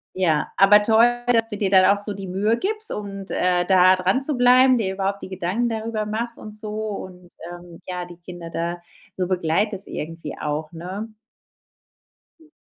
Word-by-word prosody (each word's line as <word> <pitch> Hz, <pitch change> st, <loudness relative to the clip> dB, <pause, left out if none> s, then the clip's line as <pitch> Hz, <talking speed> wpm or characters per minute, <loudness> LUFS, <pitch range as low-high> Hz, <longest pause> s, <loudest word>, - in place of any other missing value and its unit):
Ja, 165 Hz, -5 st, 0 dB
aber 205 Hz, +2 st, +7 dB
toll, 230 Hz, +3 st, +3 dB
dass 230 Hz, -2 st, +3 dB
du 210 Hz, -, -5 dB
dir 200 Hz, -2 st, 0 dB
dann 190 Hz, -1 st, +6 dB
auch -, -, -7 dB
so 205 Hz, 0 st, -1 dB
die 195 Hz, -1 st, -8 dB
Mühe 205 Hz, +5 st, 0 dB
gibst 430 Hz, -, +1 dB
und, 195 Hz, -2 st, -6 dB
äh, 180 Hz, -1 st, +1 dB
da 185 Hz, 0 st, +5 dB
dran 190 Hz, +8 st, 0 dB
zu 295 Hz, +1 st, +1 dB
bleiben, 250 Hz, +1 st, +5 dB
dir 195 Hz, -4 st, -1 dB
überhaupt 195 Hz, +1 st, -2 dB
die -, -, -8 dB
Gedanken 190 Hz, +6 st, -2 dB
darüber 220 Hz, -1 st, -3 dB
machst 230 Hz, +2 st, -3 dB
und 215 Hz, 0 st, -9 dB
so 215 Hz, 0 st, -7 dB
und, 195 Hz, -4 st, -6 dB, 0.2 s
ähm, 175 Hz, -1 st, -12 dB
ja, 180 Hz, -1 st, -4 dB
die 175 Hz, -1 st, -13 dB
Kinder 175 Hz, -1 st, -10 dB
da 170 Hz, +1 st, -4 dB, 0.3 s
so 180 Hz, -1 st, -2 dB
begleitest 185 Hz, +3 st, 0 dB
irgendwie 165 Hz, +2 st, -6 dB
auch, 150 Hz, +1 st, -3 dB
ne? 185 Hz, +6 st, -7 dB, 1.3 s
Hm. 320 Hz, -1 st, -22 dB
195 Hz, 180 wpm, -22 LUFS, 180-220 Hz, 1.3 s, aber